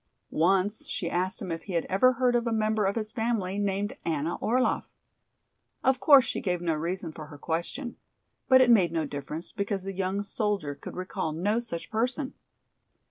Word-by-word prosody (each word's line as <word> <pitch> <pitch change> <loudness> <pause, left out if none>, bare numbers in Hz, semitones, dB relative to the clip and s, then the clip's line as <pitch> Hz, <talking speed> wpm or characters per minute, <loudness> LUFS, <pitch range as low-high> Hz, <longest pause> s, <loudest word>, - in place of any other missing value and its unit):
Once 195 - +2
she 280 -11 -3
asked 180 +2 0
him 180 - -4
if 165 - -5
he 195 - -6
had 170 - 0
ever 255 +7 +4
heard 250 0 +2
of 240 0 +1
a - - 0
member 215 -1 +1
of 195 - +1
his 215 -2 -3
family 220 -5 -1
named 200 0 -1
"Anna 160 0 -1
Orlaff." 250 +4 +1 0.9
Of 265 -1 +3
course 280 -3 +7
she - - -3
gave 180 -4 0
no 170 -2 0
reason 165 +2 -3
for 155 -1 -9
her 150 -1 -11
question. 175 - -3 0.5
But 260 -1 +8
it 245 -2 +6
made 185 -8 +5
no 165 -2 0
difference, 145 +4 -6
because 200 -1 -2
the 195 0 -4
young 190 +2 -1
soldier 200 -7 -1
could 140 - -9
recall 185 -3 -3
no 205 +8 +1
such 225 -9 -6
person. 255 +5 0
195 Hz, 190 wpm, -28 LUFS, 170-230 Hz, 0.9 s, But